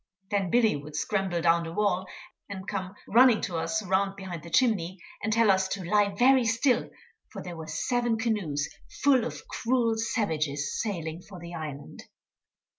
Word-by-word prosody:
Then 200 -3 +1
Billy 225 -3 +3
would 145 +1 -8
scramble 190 -2 -1
down 170 0 +4
the 165 - -6
wall, 190 -2 0 0.4
and 190 -1 -7
come 190 +1 -4
running 240 0 +6
to 175 -3 -3
us 215 +4 -1
'round 195 +1 +1
behind 185 -4 -7
the 170 - -10
chimney, 190 -3 +1 0.2
and 220 - -1
tell 225 -1 +5
us 190 0 +2
to 190 0 -4
lie 205 0 +2
very 260 +2 +5
still, 235 +3 +2 0.4
for - - -7
there 175 -1 -7
were 160 -1 -8
seven 235 +9 0
canoes 200 -12 -1 0.4
full 270 -4 +5
of - - -6
cruel 235 -1 +1
savages 155 - -1
sailing 170 -5 -4
for 185 -1 -12
the 170 0 -9
island. 150 -4 -7
195 Hz, 170 wpm, -28 LUFS, 170-225 Hz, 0.4 s, running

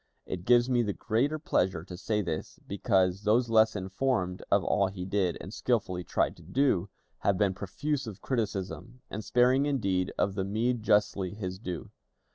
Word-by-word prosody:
It 90 -1 -5
gives 120 0 +5
me 125 -2 +3
the 105 -3 -1
greater 125 +7 0
pleasure 95 - 0
to 90 0 -9
say 105 +3 -1
this, 80 -3 -4
because 95 -1 +1
those 115 +3 +2
less 110 0 +5
informed 95 -1 -1
of - - +3
all 100 - +2
he 95 -2 -6
did, 95 -2 0
and 95 - -8
skillfully 95 -9 0
tried - - 0
to - - -15
do, 95 - +1 0.3
have 100 -2 +1
been 100 -1 +2
profuse 130 +8 -3
of 105 -4 -7
criticism, 110 0 -3
and 110 - -4
sparing 130 +5 +3
indeed 95 -10 0
of 100 - +1
the 95 -1 -1
meed 115 +5 0
justly 100 -3 +1
his 95 -3 -5
due. 90 -6 -6
100 Hz, 175 wpm, -29 LUFS, 95-120 Hz, 0.3 s, gives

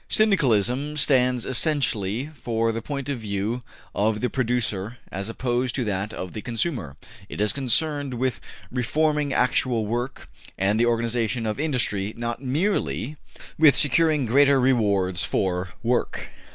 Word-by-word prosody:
Syndicalism 145 - +2
stands 125 -4 +3
essentially 130 - 0
for 115 -1 0
the 115 +1 -4
point 140 +3 -5
of 140 -4 -2
view 105 +3 -2 0.3
of 105 +1 +1
the 125 -1 -1
producer 120 -3 -1
as 95 +3 -4
opposed 125 +1 -1
to 130 - 0
that 100 0 -2
of 90 -4 -6
the 110 - -5
consumer; 115 - -3 0.3
it - - -7
is 105 -1 +2
concerned 140 +1 0
with 130 +1 -1 0.3
reforming 150 +4 0
actual 125 -3 +1
work, 120 +4 -4 0.3
and 100 +3 +1
the 120 - +3
organization 115 0 0
of 110 +3 -2
industry, 115 -9 0
not 120 +1 -3
MERELY 150 - -1 0.4
with 155 -3 +7
securing 155 -1 +3
greater 140 +3 +4
rewards 100 -8 +2
for 90 -1 -1
work. 120 +1 -1
120 Hz, 140 wpm, -24 LUFS, 110-140 Hz, 0.4 s, with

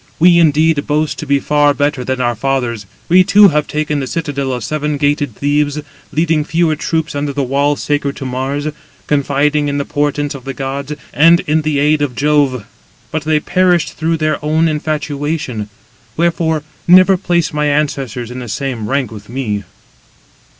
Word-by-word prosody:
We, 170 +1 +5
indeed, 155 -1 +3
boast 150 +1 0
to 155 - -6
be 140 0 +2
far 145 0 +2
better 145 -2 0
than 130 +1 -2
our 120 -1 +1
fathers. 120 -3 -2 0.2
We 185 +2 +6
too 205 +2 +6
have 150 -2 0
taken 150 -1 -1
the 135 - -3
citadel 140 -3 -3
of 125 -3 -3
seven 150 +2 -2
gated 145 -4 0
Thebes, 145 +1 0 0.3
leading 155 0 +1
fewer 160 0 +1
troops 160 0 -2
under 145 0 -2
the 140 0 -1
wall 140 +3 +1
sacred 145 -1 -2
to 135 - -7
Mars, 135 +3 -3 0.4
confiding 145 +1 +1
in 145 0 -1
the 140 - -2
portents 145 0 -1
of 135 -2 -9
the 135 0 -6
gods, 135 +2 -4 0.2
and 165 +4 +5
in 155 +1 0
the 150 -1 -1
aid 150 +1 +2
of 140 -4 -1
Jove: 140 -5 +1 0.5
but 155 -1 -3
they 155 -1 +2
perished 180 0 +1
through 165 +1 -1
their 155 -1 -1
own 155 +2 +2
infatuation. 150 -6 -3 0.5
Wherefore, 160 -2 0 0.2
never 185 +2 +7
place 175 -3 0
my 150 0 0
ancestors 135 -5 -1
in 125 - -6
the 120 -2 -7
same 120 -1 -3
rank 135 -4 -1
with 105 -1 -11
me." 110 -6 -3
145 Hz, 175 wpm, -15 LUFS, 135-155 Hz, 0.5 s, never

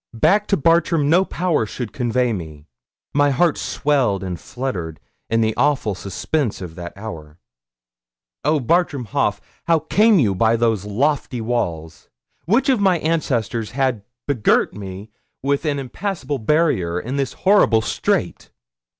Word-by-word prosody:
Back 205 - +3
to 200 - +2
Bartram 165 -1 +2
no 180 +3 +5
power 170 - -1
should 110 -2 -6
convey 125 -1 0
me. 80 -6 -7 0.5
My 145 0 +3
heart 150 +4 +2
swelled 130 -10 0
and 90 -2 -4
fluttered 95 - -5 0.3
in 115 0 +2
the 110 -1 +1
awful 135 -6 +1
suspense 105 - -2
of 90 -3 -7
that 85 +1 -8
hour. 80 -8 -8 1.1
Oh, 150 +2 +2
Bartram 145 0 +1
Haugh! 105 0 0 0.3
how 165 -1 +4
came 210 +7 +3
you 110 - +3
by 110 +4 +2
those 110 -4 0
lofty 130 +4 -1
walls? 85 -10 -3 0.4
Which 235 - +2
of 260 -5 +3
my 190 -3 +3
ancestors 125 -9 -1
had 130 -5 +1 0.2
begirt 125 -7 +2
me 100 +1 -8 0.3
with 140 +3 0
an 145 -2 0
impassable 145 +1 -4
barrier 110 - +1
in 125 +9 -4
this 135 -2 -1
horrible 185 - +3
strait? - - -1
125 Hz, 140 wpm, -20 LUFS, 105-155 Hz, 1.1 s, no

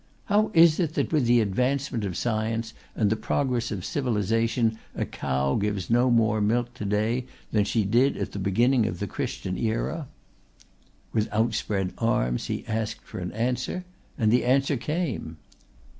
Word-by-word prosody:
"How 210 +1 +2
is 165 0 +7
it 160 -3 0
that - - -1
with 145 -6 +3
the 120 0 +5
advancement 125 +3 0
of 90 -3 -3
science 115 0 -1 0.2
and 105 -2 +2
the - - +3
progress 120 +1 -1
of 95 -5 -4
civilization 115 -2 0 0.2
a - - -1
cow 65 +1 -1
gives 100 -2 -1
no 120 +2 +4
more 110 -2 +3
milk 120 +3 +1
to 115 -4 -6
day 110 +5 0 0.2
than 105 -2 +2
she 105 +2 +1
did 120 +7 +3
at - - -3
the 100 - -5
beginning 115 +5 +3
of 85 - -3
the 100 - -3
Christian 95 -1 -4
era?" 120 +7 -1 1.1
With 110 -1 +1
outspread 105 -3 0
arms 60 - 0
he - - -3
asked 110 -1 -2
for - - -8
an 90 0 -4
answer 125 +10 -2 0.3
and 110 -4 +2
the 125 - +4
answer 135 +3 +2
came. 135 - -3
115 Hz, 165 wpm, -26 LUFS, 105-125 Hz, 1.1 s, is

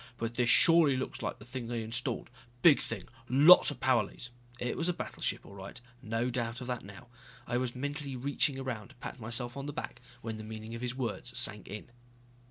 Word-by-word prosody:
But 115 0 -3
this 120 0 +2
surely 165 -4 +7
looks 130 0 -4
like 105 - -3
the 105 - -13
thing 120 -1 -5
they 115 -1 -2
installed. 120 +2 -2 0.3
Big 160 -5 +8
thing. 110 -5 -5 0.3
Lots 145 +8 +8
of 145 -4 -5
power 130 -3 +4
leads 120 +3 -9
" 120 0 -19
It 125 - -1
was 170 +1 0
a - - +2
battleship - - -3
all - - -12
right, 95 0 -8 0.2
no 115 +1 -1
doubt 120 0 -2
of 125 - -6
that 125 -2 -3
now. 100 +4 -11 0.4
I 120 - 0
was 125 -1 -2
mentally 145 +1 -3
reaching 140 +2 0
around 125 -6 -4
to - - -18
pat 125 - -7
myself 120 +2 -2
on 140 +1 -5
the 145 - -4
back - - -6 0.2
when 110 -1 -4
the 110 - -7
meaning 110 +1 -7
of 115 - -6
his 125 0 -2
words 125 -5 -3
sank 105 +1 0
in. 105 +3 -8
120 Hz, 220 wpm, -32 LUFS, 115-130 Hz, 0.4 s, Big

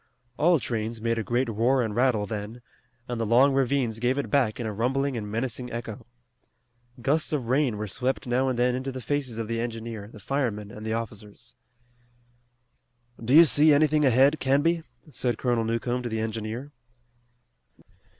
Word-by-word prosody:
All 170 +6 +4
trains 115 -3 -3
made 115 +1 -1
a - - -2
great 120 +5 0
roar 120 +4 +2
and 110 -2 -3
rattle 120 -4 +2
then, 110 +3 -6 0.4
and 120 -2 -3
the - - +1
long 130 +5 +5
ravines 130 -4 0
gave 125 +3 +1
it 140 - -3
back 130 -7 +2
in 120 - -3
a 110 - -3
rumbling 135 +5 0
and 105 -3 -4
menacing 120 +2 -3
echo. 120 0 -6 1.0
Gusts 155 +5 +1
of 135 -7 -2
rain 130 -4 +2
were 105 - -3
swept 125 +6 -2
now 130 +2 +1
and 125 - -2
then 125 +1 +2
into 130 +2 -3
the 130 - -6
faces 130 -1 -3
of 115 -1 -3
the 115 0 -2
engineer, 115 -3 -5
the 110 - -13
firemen 105 -4 -2
and 105 - -9
the 110 0 -2
officers. 105 -2 -7 1.7
"Do 125 +5 +3
you 170 +2 +10
see 150 0 +5
anything 150 +1 +3
ahead, 135 +3 +4
Canby?" 145 +6 +2 0.3
said 120 -3 -1
Colonel 120 -3 0
Newcomb 120 +2 -1
to 120 - -4
the 110 -1 -2
engineer. 110 +5 -4
120 Hz, 175 wpm, -26 LUFS, 110-135 Hz, 1.7 s, you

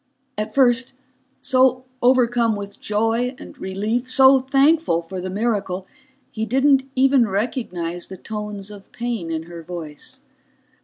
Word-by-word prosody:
At 215 +1 -3
first, 255 -2 +3 0.5
so 255 -1 +3 0.2
overcome 245 -2 +3
with 200 0 -8
joy 225 +4 0
and - - -11
relief, 215 +7 -2
so 265 +1 +6
thankful 270 - +2
for 185 +2 -6
the 185 - -4
miracle, 200 -3 -2 0.5
he 220 - -4
didn't 270 +3 +3
even 265 -2 +4
recognize 185 -5 -3
the 190 - -9
tones 210 0 -6
of 200 -1 -13
pain 235 -7 -4
in 160 -1 -3
her 170 0 -9
voice. 160 -3 -8
225 Hz, 135 wpm, -21 LUFS, 190-255 Hz, 0.5 s, so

